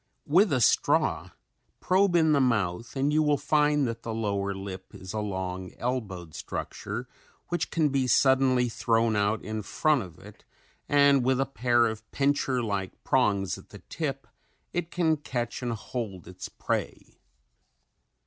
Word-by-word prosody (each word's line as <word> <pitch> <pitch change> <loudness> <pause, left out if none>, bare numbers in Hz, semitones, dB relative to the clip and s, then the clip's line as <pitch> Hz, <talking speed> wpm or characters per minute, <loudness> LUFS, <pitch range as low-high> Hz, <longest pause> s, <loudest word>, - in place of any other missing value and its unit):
With 180 +6 +4
a 130 -3 +2
straw - - +2 0.5
probe 185 0 +2
in 160 -2 +4
the 145 -2 +4
mouth 115 -3 0
and 140 +2 +1
you 155 - +4
will 150 -1 +3
find 150 -2 +2
that 115 0 -5
the 115 -1 -4
lower 100 -3 -1
lip 95 -1 -8
is 95 -1 -8
a 110 - -2
long 95 -3 -4
elbowed 100 -10 -4
structure 115 +5 -5 0.4
which 175 -2 -1
can 155 -3 +2
be 135 -2 0
suddenly 130 0 +4
thrown 115 -1 +1
out 105 +1 +1
in 110 0 -4
front 150 +6 +1
of 90 -4 -10
it 100 +2 -15 0.5
and 140 -2 +5
with 130 +1 +2
a 135 - +2
pair 120 -3 +2
of 110 -1 -4
pincher 135 -3 +1
like 100 -3 -4
prongs 100 -7 +1
at - - -17
the - - -13
tip 135 -5 -3 0.5
it 175 -1 -2
can 160 -3 +1
catch 120 -5 -4
and 120 -2 -2
hold 105 -5 -6
its 90 0 -8
prey. - - -4
120 Hz, 160 wpm, -27 LUFS, 105-140 Hz, 0.5 s, and